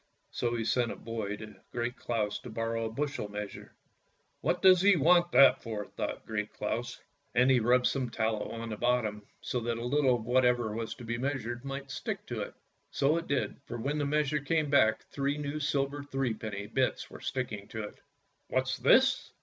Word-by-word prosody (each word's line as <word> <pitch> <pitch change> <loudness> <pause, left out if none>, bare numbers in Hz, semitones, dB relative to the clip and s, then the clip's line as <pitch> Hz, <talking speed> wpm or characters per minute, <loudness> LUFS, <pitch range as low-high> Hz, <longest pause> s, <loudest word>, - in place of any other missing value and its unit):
So 120 -1 -1
he 115 -1 -2
sent 120 0 +1
a - - -5
boy 110 -3 -4
to 110 0 -10
Great 120 +1 -2
Claus 105 -3 -2
to 125 - -10
borrow 115 0 -2
a 110 - -3
bushel 140 -3 -3
measure. 105 0 -7 0.3
" - - -43
What 175 - 0
does 185 -2 +8
he 200 0 +6
want 175 +3 +4
that 140 - +7
for! 110 -3 -4
" - - -23
thought - - -4
Great - - -3
Claus, - - -3 0.4
and 125 +2 +5
he 130 - +5
rubbed 125 +2 +3
some 130 -3 0
tallow 110 -2 -1
on 115 0 -5
the 110 - -4
bottom, 110 -3 0
so 125 - -2
that 115 0 -2
a 115 - -4
little 135 0 +3
of 115 -2 -5
whatever 120 -2 +2
was 115 0 -4
to - - -11
be 120 +1 -3
measured 120 -3 -3
might 135 0 -5
stick 155 +1 -4
to - - -4
it. - - -6 0.3
So 145 +3 +2
it 170 - -4
did, 140 - -1
for 120 - -5
when 140 +6 -1
the 145 - 0
measure 150 0 +1
came 150 +1 0
back 110 -6 +4
three 140 +1 -1
new 145 +1 -3
silver 140 -1 0
threepenny 115 -7 -3
bits - - -1
were - - -10
stick 130 -2 -2
ing 100 -2 -7
to 110 -1 -5
it. 105 - -9 0.2
" - - -44
What's - - 0
this? - - +4
125 Hz, 210 wpm, -30 LUFS, 115-140 Hz, 0.4 s, does